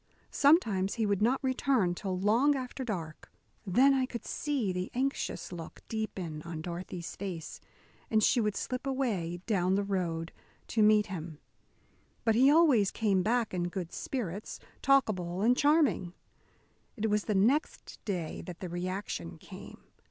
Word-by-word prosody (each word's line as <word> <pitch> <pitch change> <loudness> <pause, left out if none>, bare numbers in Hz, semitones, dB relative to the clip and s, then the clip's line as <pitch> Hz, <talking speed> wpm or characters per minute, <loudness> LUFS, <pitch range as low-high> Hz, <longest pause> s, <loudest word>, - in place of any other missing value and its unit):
Sometimes 220 - +3
he 225 -2 0
would 200 -1 0
not 250 +6 +2
return 260 -7 +1
till 185 +1 -3
long 235 +9 +3
after 260 0 -4
dark. 170 -10 -5 0.4
Then 260 +9 +5
I 260 -1 +1
could 235 -3 -7
see 270 -11 -1
the 180 +1 -3
anxious 270 -5 -2
look 165 -2 -8
deepen 190 -8 -4
on 165 0 -6
Dorothy's 175 0 -6
face, 185 -5 -6 0.5
and 215 -1 +3
she 240 - +4
would 210 -2 0
slip 255 +1 -3
away 200 -11 -1
down 190 -4 +1
the 200 - +1
road 175 -4 -2 0.4
to 225 - +1
meet 210 0 +5
him. 165 -5 -6 0.9
But 225 - +4
he 255 +5 +5
always 285 - +5
came 200 -4 +1
back 225 +2 0
in 175 -1 -1
good 175 -2 -5
spirits, 210 -6 -4 0.2
talkable 200 -10 +2
and 245 +3 +5
charming. 280 - +2 0.8
It 220 0 0
was 210 0 +1
the 210 - 0
next 245 +11 0
day 180 -6 -3
that 175 -2 -7
the 185 - -5
reaction 175 - -4
came. - - -12
205 Hz, 150 wpm, -30 LUFS, 180-250 Hz, 0.9 s, Then